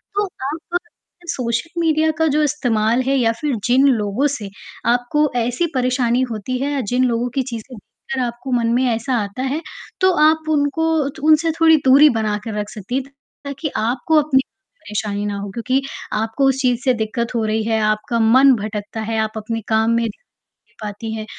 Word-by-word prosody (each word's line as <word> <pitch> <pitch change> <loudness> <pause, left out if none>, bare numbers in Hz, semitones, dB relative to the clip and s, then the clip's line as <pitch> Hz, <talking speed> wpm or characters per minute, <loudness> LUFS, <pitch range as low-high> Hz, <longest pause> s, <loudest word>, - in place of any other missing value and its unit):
तो 410 0 +2
आप 325 +1 -4 0.5
social 250 +6 -2
media 315 -1 +2
का 320 - +4
जो 300 +1 +2
इस्तेमाल 240 -5 +1
है 275 - +2
या 230 -3 +3
फिर 290 -5 0
जिन 260 +3 +4
लोगों 230 +2 +1
से 205 -3 -7 0.4
आपको 280 +5 +1
ऐसी 245 +9 0
परेशानी 250 -1 +1
होती 225 +4 -3
है 285 +2 -1
या 275 - 0
जिन 255 +1 +3
लोगों 240 0 0
की 270 - +2
चीज़ें 240 0 -7 0.4
देखकर 265 - -1
आपको 240 +2 -5
मन 235 -2 +1
में 255 +2 +2
ऐसा 250 +3 -3
आता 200 +6 -6
है, 280 +5 -2 0.4
तो 375 0 +5 0.2
आप 315 0 -1
उनको 300 +2 +1 0.2
तो 280 - -12
उनसे 315 +1 +4
थोड़ी 320 -1 +6
दूरी 280 +3 +7
बनाकर 210 0 -2
रख 205 0 -4
सकती 215 +2 -6
हैं 270 - 0 0.4
ताकि 280 +2 -4
आपको 245 +8 0
अपनी 270 -3 +2 0.4
परेशानी 205 0 -3
ना 205 -1 -3
हो, 200 0 -5
क्योंकि 255 +5 0 0.3
आपको 225 +6 0
उस 265 0 0
चीज़ 250 -2 +2
से 255 - +4
दिक्कत 235 +2 -3
हो 225 - +1
रही 215 0 0
है, 220 0 0
आपका 215 +2 0
मन 260 +4 +6
भटकता 210 +1 -5
है, 225 +1 -2
आप 220 0 -2
अपने 225 +1 -4
काम 220 +1 +2
में 230 0 +2
ध्यान 220 - -2
नहीं - - -36
कर 215 - -9
पाती 220 +2 -6
है, 215 -1 -5
245 Hz, 195 wpm, -19 LUFS, 220-280 Hz, 0.5 s, दूरी